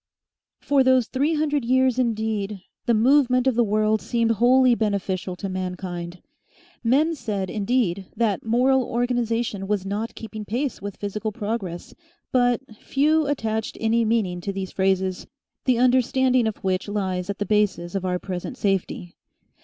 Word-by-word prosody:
For 280 -2 +3
those 260 -2 +4
three 285 +7 0
hundred 295 -3 0
years, 255 +1 +2
indeed, 215 -4 -1 0.3
the 235 - +4
movement 255 +2 +4
of 265 - +3
the 240 +1 +3
world 215 0 +1
seemed 230 -1 +1
wholly 250 +3 +5
beneficial 195 -4 -1
to 195 - -5
mankind. 180 -2 -5 0.6
Men 285 +8 +3
said, 210 - -3
indeed, 200 -4 0
that 220 -5 0
moral 255 +4 +3
organisation 235 -4 -1
was 205 -2 -1
not 210 +3 -3
keeping 220 -1 -7
pace 245 +5 -3
with 200 -1 -6
physical 210 +2 -3
progress, 205 -5 -4 0.4
but 245 -1 +2 0.2
few 305 +5 +1
attached 220 -6 -2
any 225 +1 +2
meaning 215 -6 0
to 200 - -3
these 190 -1 -5
phrases, 190 -1 0 0.4
the 255 -3 +3
understanding 255 0 +3
of 220 - -3
which 190 0 -1
lies 190 -3 -2
at 200 - -2
the 205 - -2
basis 200 -4 0
of 195 -2 -2
our 180 -1 0
present 185 +6 -6
safety. 190 -4 -2
220 Hz, 150 wpm, -24 LUFS, 195-250 Hz, 0.6 s, wholly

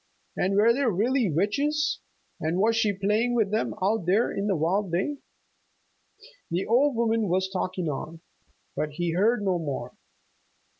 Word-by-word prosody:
And 190 +2 0
were 220 +3 +5
there 270 0 +1
really 230 +3 +1
witches, 285 - 0 0.4
and 160 +3 -1
was 220 +4 +3
she 225 -2 +2
playing 210 +5 0
with 215 -4 +1
them 220 +1 -1
out 200 -2 0
there 205 +6 +3
in 200 +1 -2
the 195 - +1
wild 180 +4 0
day? 195 +12 -1 1.3
The 175 +3 -1
old 265 +4 +3
woman 225 -2 +1
was 185 +1 +1
talking 185 -2 -3
on, 155 +3 -5 0.5
but 150 -1 -2
he 170 +2 -1
heard 210 +6 +2
no 185 -3 +1
more. 145 -5 -4
200 Hz, 155 wpm, -26 LUFS, 180-230 Hz, 1.3 s, were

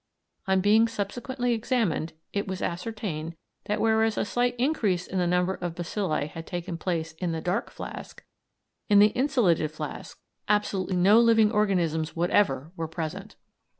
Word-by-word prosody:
On 190 0 +3
being 215 +3 +5
subsequently 240 +4 -2
examined 220 -9 0 0.2
it 200 0 -1
was 190 -1 -4
ascertained 175 -4 -4 0.3
that 210 - -1
whereas 220 0 +2
a - - +1
slight 245 +3 0
increase 225 - +1
in 190 - -3
the 175 - +1
number 180 +1 +1
of 175 -3 -5
bacilli 175 -3 -2
had 165 +1 -9
taken 175 0 -4
place 165 -1 -2
in 175 -3 -1
the 160 - -2
"dark" 180 +3 -1
flask, - - -9 0.7
in 205 - +6
the 205 +1 +7
insolated 215 - +2
flask 155 - -7 0.3
absolutely 200 -3 +1
no 195 +5 +6
living 225 -2 +5
organisms 175 -7 0
whatever 165 -4 +1
were 165 -2 -3
present. 170 +5 -6
190 Hz, 150 wpm, -27 LUFS, 170-220 Hz, 0.7 s, the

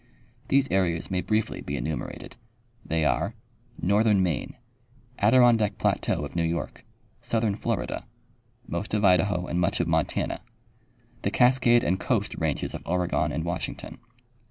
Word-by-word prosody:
These 140 0 +3
areas 90 -3 0
may 90 -1 +1
briefly 110 +2 -1
be 70 0 -4
enumerated. 80 +1 -5 0.5
They 80 -1 0
are: 100 +8 0 0.4
Northern 100 +2 +3
Maine. 80 -8 -2 0.6
Adirondack 115 -1 +4
plateau - - 0
of - - -10
New 85 - +1
York. 85 0 -3 0.4
Southern 110 -3 0
Florida. - - -3 0.6
Most 95 +6 -3
of 105 -1 +2
Idaho 90 0 +3
and 90 - -2
much 95 +4 +1
of 85 - 0
Montana. 80 -1 0 0.8
The - - 0
Cascade 125 -1 +4
and 95 +2 +1
Coast 105 -3 0
ranges 80 -3 -1
of - - -6
Oregon 90 0 0
and 80 - -2
Washington. 85 +1 -5
95 Hz, 135 wpm, -26 LUFS, 85-110 Hz, 0.8 s, Adirondack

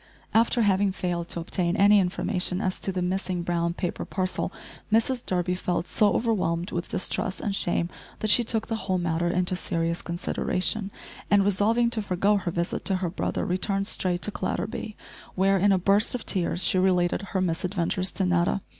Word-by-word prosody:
After 230 +1 +3
having 200 -1 +2
failed 175 -2 -3
to - - -1
obtain 175 +2 -1
any 205 +1 +6
information 180 0 0
as 185 -2 -1
to 195 - +2
the 180 -1 -2
missing 185 -1 -2
brown 170 0 -1
paper 175 - -3
parcel, 185 -1 -2 0.4
Mrs 240 +3 +2
Durby 180 0 -1
felt 180 -1 -2
so 210 -1 +2
overwhelmed 180 -6 0
with 175 0 -3
distress 185 +1 -2
and 200 -2 -2
shame 175 -2 +1 0.3
that 215 - 0
she 240 - +6
took 220 -1 -1
the 225 -1 -3
whole 185 -4 -1
matter 170 -1 0
into 180 +1 0
serious 170 -1 -1
consideration, 185 +3 -1 0.4
and, 200 -1 +4
resolving 225 +4 +2
to 225 - 0
forego 200 +1 +1
her 185 -3 -3
visit 170 0 -2
to 195 - +3
her 180 -2 -2
brother, - - -2
returned 195 +2 0
straight 180 -3 0
to 210 - +1
Clatterby, 210 +2 -4 0.4
where, 195 +1 +3
in 200 +2 +4
a 190 - +4
burst 200 +6 +2
of 245 - -5
tears, 180 -2 +1
she 185 - +3
related 180 -1 +2
her 195 -1 -3
misadventures 180 +1 -1
to 190 - 0
Netta. 180 +2 +1
185 Hz, 180 wpm, -26 LUFS, 175-205 Hz, 0.4 s, any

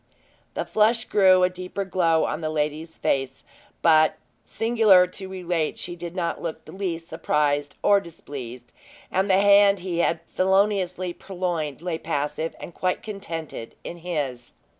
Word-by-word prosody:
The - - -2
flush 225 +2 +3
grew 185 -2 +5
a 180 - +4
deeper 185 +2 -5
glow 170 -3 +2
on - - -3
the 155 - -2
lady's 155 +1 -2
face; 135 -1 -1 0.4
but, 155 -1 +5 0.3
singular 225 -5 +4
to 190 +1 -8
relate, 175 -4 -2
she 175 - -5
did 175 0 -7
not 170 -3 -2
look 165 -2 -5
the - - -11
least 170 -3 -4
surprised 145 -2 0
or 200 -1 +5
displeased; 130 -8 -9 0.4
and 190 +2 +1
the 190 - +5
hand 200 -1 +5
he 175 -2 -3
had 170 - +2
feloniously 185 -2 +1
purloined 175 -7 -4
lay 170 -3 -2
passive 155 +1 -2
and 170 - -9
quite 180 +2 -1
contented 165 - -6
in 175 - -7
his. 145 -8 -4
175 Hz, 150 wpm, -24 LUFS, 155-190 Hz, 0.4 s, grew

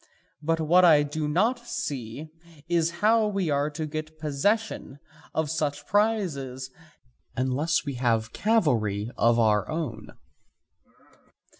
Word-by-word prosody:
But 165 +1 0
what 170 +4 +4
I 155 -4 +6
do 150 +1 -3
not 215 +11 +1
see 140 - -5 0.4
is 170 -1 +2 0.2
how 220 0 +4
we 195 -6 -1
are 145 +1 +1
to 155 +1 -4
get 155 +1 -6
possession 155 +3 -1 0.4
of 155 -2 0
such 150 -3 -2
prizes 160 - 0 0.6
unless 140 +7 0
we 140 - -3
have 115 -2 +1
cavalry 120 - +1
of 115 0 +3
our 105 -3 +2
own. 150 -10 -4
155 Hz, 120 wpm, -26 LUFS, 130-170 Hz, 0.6 s, I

